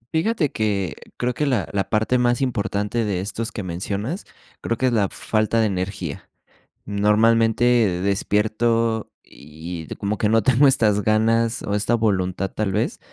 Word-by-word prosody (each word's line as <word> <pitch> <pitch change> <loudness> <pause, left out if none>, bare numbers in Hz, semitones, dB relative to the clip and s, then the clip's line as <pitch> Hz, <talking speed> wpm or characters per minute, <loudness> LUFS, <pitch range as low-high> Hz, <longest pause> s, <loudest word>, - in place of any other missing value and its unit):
Fíjate 165 - +1
que 100 -6 -1 0.2
creo 125 0 -1
que 150 +3 -1
la 120 -7 0
la 95 -1 -1
parte 110 +3 +1
más 120 +1 +2
importante 105 -2 -1
de 100 -4 -1
estos 110 +4 -4
que 105 - -5
mencionas 100 - -4 0.4
creo 115 - -2
que 130 - 0
es 125 - +2
la 105 -3 +3
f - - -8
falta 110 +1 +1
de 110 - +3
energía. 95 -5 -4 0.6
Normalmente 110 +3 +3 0.4
despierto 110 +3 0
y 80 +3 -9
y - - -3
como 100 0 -3
que 105 - +2
no 110 -2 +3
tengo 130 +4 +5
estas 105 -5 +3
ganas 115 +2 +1
o 100 - -3
esta 110 +3 +1
voluntad, 95 -4 0
tal 105 -3 -1
vez, - - -1
110 Hz, 165 wpm, -22 LUFS, 100-115 Hz, 0.6 s, tengo